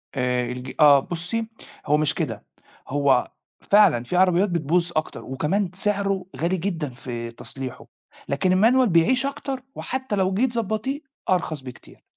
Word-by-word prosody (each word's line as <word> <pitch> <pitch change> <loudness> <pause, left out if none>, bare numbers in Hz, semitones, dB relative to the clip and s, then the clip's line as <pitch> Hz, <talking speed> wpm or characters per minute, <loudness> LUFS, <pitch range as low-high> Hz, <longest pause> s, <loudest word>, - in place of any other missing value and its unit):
آآ، 125 -1 0
الج 125 +1 -6
آه، 145 -2 +8
بُصّي، 175 +9 -3 0.4
هو 150 0 +3
مش 155 0 +2
كده، 125 - -3 0.4
هو 140 -2 +2 0.3
فعلًا 195 - +4
فيه 180 +8 -2
عربيات 185 +1 +4
بتبوظ 170 +1 0
أكتر، 155 - -2
وكمان 175 +8 -1
سعره 195 -1 0
غالي 175 +3 0
جدًا 165 -5 -2
في 120 -2 -6
تصليحُه، 130 +2 -8 0.4
لكن 180 +7 +1
الmanual 255 +2 +5
بيعيش 235 +11 +3
أكتر 275 -2 -4
وحتى 260 -4 -3
لو 190 -1 +1
جيتِ 240 +5 +1
تضبطيه 230 +6 -2 0.3
أرخص 165 -5 0
بكتير. 125 -2 -12
175 Hz, 145 wpm, -24 LUFS, 140-205 Hz, 0.4 s, آه